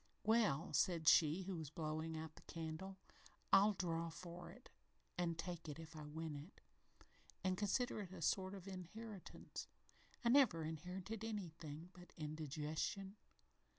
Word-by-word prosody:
"Well," 210 -8 +4
said 165 -3 +3
she 160 +4 +7
who 185 -1 -2
was 155 -3 -4
blowing 155 +1 -2
out 160 0 -5
the - - -12
candle, 165 +4 -4 0.6
"I'll 205 +2 +8
draw 170 -3 0
for 170 +1 -7
it - - -13 0.4
an' 170 -2 +1
take 165 -1 -4
it 145 - -4
if 160 0 -9
I 150 -1 -6
win 160 0 -3
it, 145 +7 -9 0.8
an' 185 -1 +3
consider 210 +4 +1
it 190 -3 -6
a 180 -3 -5
sort 190 +4 +2
of 190 -1 -8
inheritance. 195 +2 -6 0.6
I - - +6
never 240 - +6
inherited 180 +7 -4
anything 170 -6 -4
but 180 -1 -13
indigestion." 155 +6 -2
170 Hz, 145 wpm, -42 LUFS, 160-195 Hz, 0.8 s, I'll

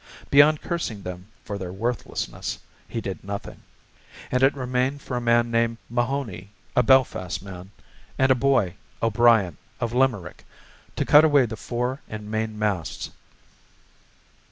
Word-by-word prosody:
Beyond 145 +2 +6
cursing 125 - -3
them 90 +1 -7 0.2
for 100 -2 -5
their 90 -3 -5
worthlessness, 115 +4 -3 0.3
he 115 - -4
did 95 -3 -5
nothing; 100 +1 -6 0.7
and 125 - +1
it 135 +2 +4
remained 130 +1 -1
for 125 - -4
a 120 - -1
man 120 0 +3
named 115 0 +1
Mahoney, 120 -6 -2 0.3
a - - +6
Belfast 110 -8 +2
man, 95 -1 -9 0.5
and 130 0 +4
a - - +9
boy, 125 -8 +2 0.3
O'Brien, 115 -6 +4 0.2
of 120 -1 -2
Limerick, 120 -9 0 0.5
to - - -1
cut 150 +1 +7
away 145 -4 +5
the 110 -1 -5
fore 125 +5 -3
and 105 -1 -7
main 110 0 -2
masts. 105 -6 -2
115 Hz, 140 wpm, -24 LUFS, 100-130 Hz, 0.7 s, a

